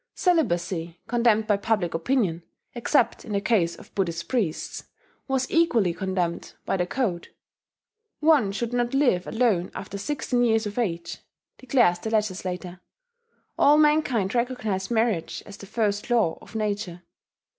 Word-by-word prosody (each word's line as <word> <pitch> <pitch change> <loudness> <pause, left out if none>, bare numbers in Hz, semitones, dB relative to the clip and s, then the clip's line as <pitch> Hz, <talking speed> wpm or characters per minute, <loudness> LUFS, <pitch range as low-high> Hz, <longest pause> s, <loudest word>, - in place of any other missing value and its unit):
Celibacy, 175 - 0
condemned 230 -2 +2
by 210 -2 +2
public 200 -4 0
opinion, 175 -2 0 0.3
except 240 +1 +1
in 210 - -6
the 200 - +2
case 200 -5 +1
of - - -16
Buddhist 170 -4 -2
priests, 210 -11 -2 0.4
was 265 -1 +1
equally 240 - +3
condemned 180 -2 -2
by - - 0
the 180 -2 0
code. 185 -8 -2 0.9
"One 300 -10 +4
should 235 +4 -3
not 245 +1 0
live 245 -11 +2
alone 220 -7 +1
after 195 +1 -6
sixteen 250 -1 -1
years 225 -2 +2
of 210 +3 -4
age," 170 -7 -2 0.4
declares 240 -9 +3
the 220 - -4
legislator; 185 -4 -2 0.8
"all 290 +1 +6
mankind 295 -10 +3
recognize 230 -6 -1
marriage 225 -7 0
as 205 -1 -11
the 200 - -11
first 210 +1 -1
law 225 -9 +2
of 205 - -15
nature." 205 -5 -3
210 Hz, 140 wpm, -25 LUFS, 180-245 Hz, 0.9 s, all